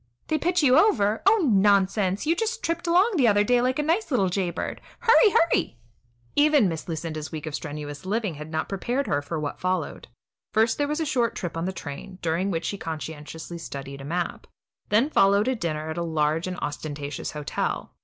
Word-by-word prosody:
They 310 - +1
pitch 350 +1 +1
you 265 +1 +6
over? 220 - +3
Oh, 405 -4 +5
nonsense! 200 0 +3
you 325 +2 +2
just 455 +4 -2
tripped 335 +1 -2
along 365 +7 +4
the 255 -5 +4
other 205 -1 +4
day 245 +3 +3
like 255 +1 +1
a 300 - +1
nice 335 +8 0
little 200 -10 +2
jay 185 -1 0
bird. - - -5 0.2
Hurry, 460 -1 +6
hurry!" 330 - +2 0.6
Even 290 -6 +5
Miss 165 -3 -4
Lucinda's 155 -1 -4
week 155 -1 -5
of 155 - -5
strenuous 145 0 -6
living 205 -1 -1
had 150 +1 -8
not 160 0 -2
prepared 245 +8 -2
her 145 - 0
for 155 +3 -4
what 150 -1 -4
followed. 185 -3 -2 0.5
First, 225 +3 +3
there 290 - +1
was 300 +2 -1
a - - 0
short 245 -6 0
trip 175 -4 -4
on 165 +1 -2
the 190 - -1
train, 170 +2 -8
during 170 +4 0
which 165 -3 -2
she 200 - -3
conscientiously 160 +2 -6
studied 140 -3 -7
a - - -8
map. 170 +4 -3 0.4
Then 235 +9 +3
followed 200 0 +4
a 260 - +2
dinner 160 -7 -3
at 165 - -4
a - - -1
large 160 +1 0
and 180 -1 -4
ostentatious 145 -1 -5
hotel. 150 -1 -3
190 Hz, 205 wpm, -25 LUFS, 160-260 Hz, 0.6 s, you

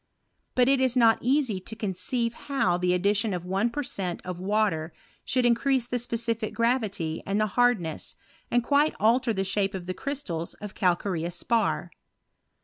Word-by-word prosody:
But 250 -1 +4
it 270 -1 +3
is 260 -1 +2
not 225 -2 +5
easy 255 -5 +1
to 220 +4 -9
conceive 225 +3 -2 0.2
how 195 -11 +2
the 180 0 +2
addition 200 +2 +1
of 175 0 -5
one 195 +6 +1
per 290 +5 -3
cent, 185 -8 -3
of 180 -1 -5
war 210 +3 +2
ter 160 0 -5 0.3
should 250 -1 +1
increase 240 +1 +2
the 245 0 -2
specific 230 -2 -2
gravity 215 -9 0
and 200 +2 -1
the 215 - +3
hard 245 -2 +4
nesa, 160 -3 -5 0.3
and 240 0 +2
quite 290 +4 +3
alter 230 +3 +3
the 195 -3 -1
shape 195 +1 0
of 180 -2 -5
the 185 - -3
crystals 185 - -4
of 210 -1 -8
calcareous 175 -2 0
spar. 230 +5 0
215 Hz, 175 wpm, -27 LUFS, 185-245 Hz, 0.3 s, not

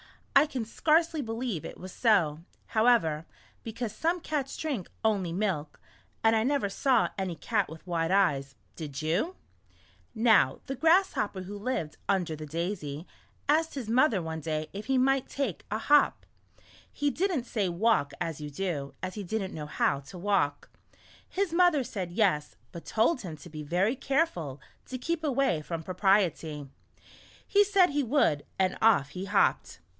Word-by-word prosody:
I 280 +3 +7
can 255 -6 -3
scarcely 320 +6 +2
believe 225 - -3
it - - -8
was 185 +1 -9
so, 175 -11 +2 0.3
however, 220 -9 +2 0.4
because 225 -1 -4
some 335 +8 0
cats 295 -4 -3
drink 275 - -3 0.2
only 200 -6 +1
milk, 170 -6 -2 0.4
and 225 0 +5
I 220 - +3
never 275 -3 +1
saw 195 -5 +2
any 185 -3 -2
cat 205 +1 -1
with 160 +2 -11
white 165 -2 -1
eyes, 145 -9 +2 0.2
did 150 -2 -6
you? 195 - 0 0.8
Now 220 - +4
the 270 - -3
Grasshopper 320 - +2
W'ho 200 +2 -7
lived 200 -9 -3
under 180 -5 +1
the 155 0 -8
daisy, 165 -2 -4 0.4
asked 315 +2 +2
his 260 -6 -4
mother 245 -4 +4
one 160 0 -4
day 155 -1 -3
if 205 +2 -7
he 265 -1 +2
might 270 +1 +2
take 270 - -3
a 215 - -1
hop." 290 +6 +3 0.7
He 290 0 0
didn't 350 -6 0
say 210 -6 -1
walk 180 -4 +2
as 160 -2 -3
you 150 - -5
do, 145 -3 -3
as 185 0 -3
he 210 - -5
did 210 +3 -2
n't 190 - -6
know 150 -1 -6
how 140 -2 +1
to 145 +7 -11
walk. 185 -6 0 0.6
His 390 -3 -1
mother 345 -5 +4
said 185 -7 -5
yes, 175 -7 +1 0.2
but 170 - -9
told 235 +6 +2
him 165 -5 -7
to 150 +4 -12
be 155 -1 -6
very 180 - +1
careful 260 - -1 0.3
to 255 - -5
keep 330 +5 -2
away 270 - +1
from 165 +1 -5
Propriety. 180 -6 +1 0.8
He 410 0 +5
said 390 -4 +4
he 290 +1 +1
would, 240 - +2 0.2
and 185 -1 +1
off 200 -11 +4
he 180 +6 -6
hopped. - - +1
200 Hz, 165 wpm, -29 LUFS, 165-265 Hz, 0.8 s, I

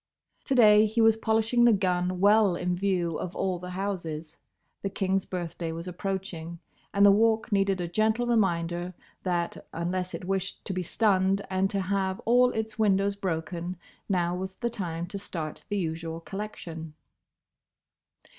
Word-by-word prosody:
To 270 - 0
day 215 -3 +7
he 220 +2 -2
was 225 -1 +6
polishing 225 +2 +2
the 240 -1 +7
gun 180 -2 0
well 205 -1 +5
in 180 +1 -1
view 175 -3 0
of 180 - -5
all 185 -2 -1
the 180 +1 -7
houses. 175 -5 -4 0.4
The 195 - -2
King's 195 0 -1
birthday 170 -2 -4
was 165 +2 -6
approaching, 180 -2 -4 0.3
and 200 0 +5
the 200 - +8
Walk 220 +2 +2
needed 195 -1 +2
a 175 - -2
gentle 220 +6 +1
reminder 175 -6 0 0.3
that 175 -2 -2
unless 180 +2 -2
it - - -7
wished 190 0 -3
to 195 - -2
be 185 - -1
stunned 195 +1 +2
and 190 +1 +1
to 200 -1 -1
have 190 0 -1
all 245 +2 +4
its 220 0 -4
windows 200 -1 +3
broken, 175 -1 -3 0.3
now 175 -2 +1
was 190 +1 -5
the 235 -1 -2
time 170 -6 -3
to 195 +3 -6
start 160 -5 -5
the 205 - -1
usual 165 -2 -3
collection. 165 -5 -7
190 Hz, 160 wpm, -28 LUFS, 175-205 Hz, 0.4 s, the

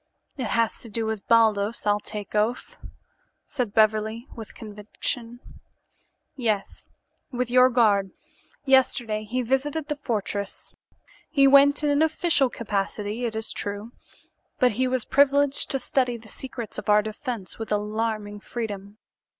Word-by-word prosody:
"It 255 -5 -3
has 230 0 0
to 230 - -10
do 225 +1 -2
with 220 -3 -4
Baldos, 220 -2 +3
I'll 205 0 +3
take 210 -1 -7
oath," 215 +4 -1 0.7
said 250 -7 -3
Beverly, 220 +2 +2
with 225 -2 -9
conviction. 225 +3 -5 0.9
"Yes, 220 -6 -2 0.5
with 250 -1 -2
your 255 0 +6
guard. 210 -6 +3 0.6
Yesterday 245 -5 +2
he 250 +4 -2
visited 280 +5 -1
the 295 - 0
fortress. 210 -7 -4 0.6
He 275 -3 +4
went 280 +2 +6
in 295 - +2
an 285 +1 +2
official 320 -3 +2
capacity, 210 +1 -3
it 225 -2 -3
is 220 0 -3
true, 205 +2 -4 0.7
but 250 -2 +4
he 255 +4 0
was 255 -2 -1
privileged 285 0 +3
to 270 - +2
study 250 -2 0
the 225 -1 -15
secrets 240 -2 -6
of 210 - -7
our 210 0 +5
defense 220 - -6
with 225 - -6
alarming 210 0 -2
freedom. 205 -2 -6
230 Hz, 140 wpm, -25 LUFS, 210-255 Hz, 0.9 s, your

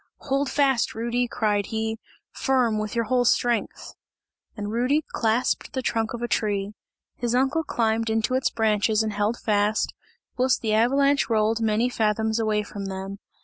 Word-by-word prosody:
"Hold 275 0 0
fast, 270 -4 +1
Rudy," 235 +2 -1
cried 210 -4 0
he, 220 0 -3 0.3
"firm, 245 -5 +1
with 215 +2 -4
your 230 - +1
whole 245 +2 +2
strength!" 240 0 0 0.6
And 205 0 -4
Rudy 255 +7 +1
clasped 230 +6 0
the 260 -2 -2
trunk 225 -1 -1
of 240 - -6
a - - 0
tree; 205 -3 -1 0.4
his 240 0 -1
uncle 270 +5 +2
climbed 225 -4 0
into 225 +3 0
its 260 0 +2
branches 220 -1 +1
and 215 -1 -2
held 210 +3 0
fast, 210 0 +1 0.4
whilst 255 -1 +2
the 215 -1 +1
avalanche 275 +6 +3
rolled 220 0 +1
many 220 +2 +2
fathoms 220 -1 0
away 215 -1 +1
from 200 -1 -7
them. 195 +1 -6
225 Hz, 160 wpm, -25 LUFS, 215-245 Hz, 0.6 s, avalanche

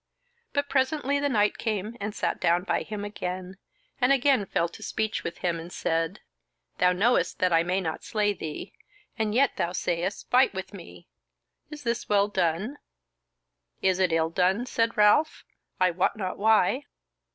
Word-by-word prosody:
But 285 0 0
presently 280 +1 +1
the 285 0 0
knight 210 -5 +2
came 215 0 -2
and 205 +1 -4
sat - - -1
down 175 +1 +3
by - - 0
him 205 -1 -5
again, 185 -2 -5 0.4
and 250 0 +3
again 270 -6 +3
fell 170 - 0
to 170 - -13
speech 220 -1 -2
with - - -5
him, 170 -2 -1
and 170 +2 -9
said: 165 +5 -1 0.6
"Thou 180 0 +5
knowest 210 +7 +2
that 180 -1 +2
I 165 - +5
may 180 +3 0
not 160 -3 -4
slay 210 -1 0
thee, 155 -5 -7 0.5
and 215 -1 0
yet 275 +1 +3
thou 170 - -1
sayest, 175 +2 -2
fight 255 -3 +4
with 190 +1 -6
me; 180 -4 -12 0.6
is 300 -1 -9
this 235 -1 -2
well 200 -1 +4
done?" 190 - -1 1.0
"Is 190 -1 +2
it 185 -2 +2
ill 165 0 +1
done?" 190 +7 +1
said 230 -2 0
Ralph, 210 +10 +3 0.3
"I 185 -1 +4
wot 180 +2 0
not 185 -3 -4
why." 220 +5 +3
200 Hz, 170 wpm, -27 LUFS, 180-235 Hz, 1.0 s, Thou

